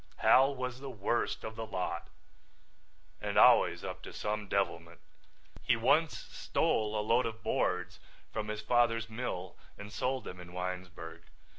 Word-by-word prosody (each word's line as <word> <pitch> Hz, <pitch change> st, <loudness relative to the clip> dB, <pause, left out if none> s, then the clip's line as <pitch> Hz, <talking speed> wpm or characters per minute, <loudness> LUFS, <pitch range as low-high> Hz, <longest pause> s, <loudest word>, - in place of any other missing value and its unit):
Hal 135 Hz, +2 st, +5 dB
was 125 Hz, -1 st, -4 dB
the 135 Hz, 0 st, -6 dB
worst 120 Hz, 0 st, -1 dB
of 110 Hz, 0 st, -5 dB
the 115 Hz, 0 st, -5 dB
lot 95 Hz, -3 st, -3 dB, 1.1 s
and -, -, -2 dB
always -, -, +6 dB
up -, -, -5 dB
to -, -, -9 dB
some 105 Hz, -1 st, -3 dB
devilment. -, -, -1 dB, 0.6 s
He -, -, +3 dB
once 140 Hz, +7 st, +3 dB
stole 110 Hz, -1 st, 0 dB
a 105 Hz, -, -2 dB
load 115 Hz, +2 st, +3 dB
of 110 Hz, -2 st, -7 dB
boards 90 Hz, -1 st, 0 dB, 0.3 s
from 110 Hz, -1 st, -2 dB
his 105 Hz, 0 st, -3 dB
father's 115 Hz, -1 st, +2 dB
mill 95 Hz, -6 st, -4 dB, 0.2 s
and 105 Hz, +1 st, -9 dB
sold 130 Hz, +4 st, -1 dB
them 90 Hz, -, -8 dB
in 90 Hz, 0 st, -11 dB
Winesburg. 90 Hz, -3 st, -6 dB
110 Hz, 150 wpm, -32 LUFS, 90-120 Hz, 1.1 s, always